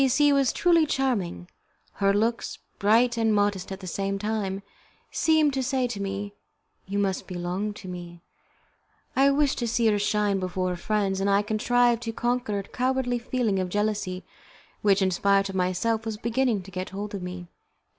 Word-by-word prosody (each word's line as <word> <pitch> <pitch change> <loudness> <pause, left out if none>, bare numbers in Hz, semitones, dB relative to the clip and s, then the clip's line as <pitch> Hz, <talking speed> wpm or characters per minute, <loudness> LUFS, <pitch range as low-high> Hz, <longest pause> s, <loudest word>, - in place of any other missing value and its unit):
C 270 - +5
C 290 +3 +4
was 275 -3 +3
truly 335 -3 +3
charming; 205 - -1 0.5
her 195 0 +5
looks, 225 +3 0 0.2
bright 235 +4 +4
and 225 -1 +2
modest 205 -2 0
at 190 +1 -6
the - - -8
same 195 +2 -2
time, 200 -2 -2 0.5
seemed 315 -3 +3
to 265 - 0
say 260 0 0
to 230 -5 -4
me, 200 +1 -4 0.5
"You 200 +1 -3
must 195 -2 -1
belong 180 +3 -3
to 190 - -10
me." 175 -1 -8 0.9
I 270 +1 +5
wished 280 0 +2
to 240 - -1
see 235 +1 +1
her 205 - +1
shine 205 -1 +1
before 185 0 -2
our 180 - -2
friends; 195 +1 -1
and 200 - +1
I 200 +1 +3
contrived 240 +2 +2
to 230 -1 -4
conquer 240 -3 -1
a 200 - -3
cowardly 250 +2 -1
feeling 235 -5 0
of 185 -1 -1
jealousy 205 -2 -1 0.6
which, 200 -1 +3
in 190 - +2
spite 195 +2 +2
of 195 - -6
myself, 185 +5 0
was 220 -1 -3
beginning 235 -2 0
to 195 - -12
get 185 0 -4
hold 205 +2 -6
of 200 - -4
me. 180 -1 -7
205 Hz, 185 wpm, -26 LUFS, 190-240 Hz, 0.9 s, C